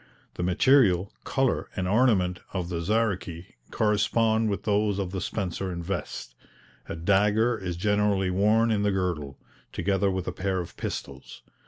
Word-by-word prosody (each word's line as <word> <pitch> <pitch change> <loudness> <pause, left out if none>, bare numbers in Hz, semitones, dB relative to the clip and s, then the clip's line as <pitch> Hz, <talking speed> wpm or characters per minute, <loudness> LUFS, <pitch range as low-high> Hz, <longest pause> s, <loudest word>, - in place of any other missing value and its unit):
The - - -6
material, 95 0 +3
colour 135 -2 0
and 95 -2 -2
ornament 95 -5 +2
of 90 -3 -3
the 85 -2 -3
Zaruchi 95 -4 -1 0.2
correspond 110 +1 +2
with 100 - -3
those 105 -1 +1
of 95 -3 -3
the 95 -1 -3
spencer 95 -1 -3
and 85 -1 -5
vest. 90 -9 -5 0.6
A - - -3
dagger 105 +7 +2
is 90 -5 -5
generally 105 -1 +1
worn 110 +5 +3
in 105 -2 +1
the 105 0 +2
girdle, 85 -8 -2 0.3
together 100 0 0
with 95 -1 -3
a - - -1
pair 95 -1 -2
of 85 - -7
pistols. - - -7
100 Hz, 155 wpm, -26 LUFS, 90-105 Hz, 0.6 s, material